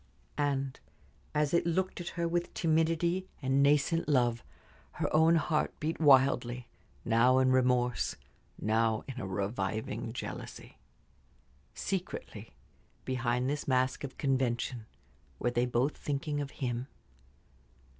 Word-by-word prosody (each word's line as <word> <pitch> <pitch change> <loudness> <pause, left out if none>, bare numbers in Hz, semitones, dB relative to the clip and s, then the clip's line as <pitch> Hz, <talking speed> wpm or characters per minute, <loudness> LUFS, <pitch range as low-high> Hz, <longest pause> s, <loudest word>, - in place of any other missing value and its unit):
And 135 -2 -1 0.6
as 150 0 +1
it 170 0 +2
looked 185 +2 -1
at 175 - -7
her 170 0 +1
with 175 +1 -1
timidity 165 +3 +1
and 135 0 +2
nascent 150 +3 +3
love 120 -4 +2 0.5
her - - -1
own 160 +2 +6
heart 160 -1 0
beat 160 +2 -2
wildly, 130 -4 +4 0.4
now 120 +3 +4
in 130 0 +4
remorse, 125 -1 +2 0.4
now 110 0 +1
in 130 -2 -6
a - - -4
reviving 100 +3 -3
jealousy. 120 - -7 1.0
Secretly, 175 - -5 0.5
behind 125 -1 0
this 145 +1 -2
mask 130 0 +1
of 135 - -6
convention, 125 -4 -1 0.5
were 120 - 0
they 120 +1 +1
both 125 +4 +1
thinking 145 +1 -2
of 140 - -4
him? 125 -2 -3
130 Hz, 120 wpm, -31 LUFS, 120-155 Hz, 1.0 s, own